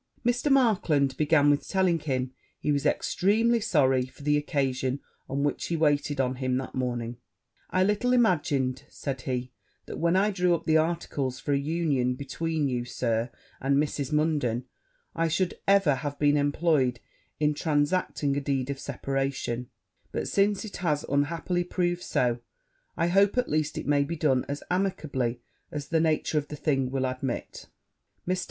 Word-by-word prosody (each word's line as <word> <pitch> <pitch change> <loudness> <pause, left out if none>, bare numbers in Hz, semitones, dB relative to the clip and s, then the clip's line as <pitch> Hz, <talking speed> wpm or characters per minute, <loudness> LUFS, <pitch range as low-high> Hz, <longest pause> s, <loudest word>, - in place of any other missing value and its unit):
Mr. 245 +4 +2
Markland 175 - +3
began 145 -1 +4
with 145 - 0
telling 185 -3 +2
him 130 -4 -2 0.3
he 150 - 0
was 140 -1 +1
extremely 225 +5 +2
sorry 130 - +2
for 135 - -15
the 150 +1 +3
occasion 135 -2 0 0.3
on 140 +1 -1
which 145 - -1
he 170 - -1
waited 145 -2 +1
on 130 -1 0
him 130 -1 0
that 130 - -5
morning; 120 -2 -2 0.5
'I 185 - +2
little 210 +5 +1
imagined,' 145 - +2
said 135 -3 -5
he, 125 -1 -3 0.3
'that - - -7
when 170 +2 +2
I 200 +3 +3
drew 180 -3 +2
up - - -6
the 160 - +3
articles 155 -5 -1
for 145 - -1
an 140 0 +1
union 145 -6 0
between 150 +3 -2
you, 125 -2 -1
Sir, 120 -1 -1 0.3
and 140 +1 +2
Mrs. 145 -1 -1
Munden, 150 -6 +1 0.5
I 165 0 +1
should 175 +3 -1
ever 195 -6 +5
have 145 +1 -4
been 145 0 +3
employed 145 -4 +2 0.4
in 150 0 +2
transacting 145 -1 0
a 145 - 0
deed 135 -1 -1
of 135 - -5
separation: 135 -3 -3 0.4
but, - - -2
since 200 +1 +1
it 210 - -7
has 155 -5 0
unhappily 165 +5 0
proved 175 0 -1
so, 120 -7 0 0.6
I 165 - +2
hope, 200 +5 +3
at 250 - +2
least, 155 -1 0
it - - -4
may 145 0 +3
be 165 +4 -4
done 135 -5 +2
as 140 +1 -4
amicably 140 -10 -1 0.3
as 145 -1 -5
the 165 - +2
nature 160 -1 +1
of 145 - -7
the 150 - -6
thing 135 -4 0
will 130 0 -1
admit.' 130 -1 -4 0.6
Mr. 185 0 +1
145 Hz, 170 wpm, -27 LUFS, 130-170 Hz, 0.6 s, ever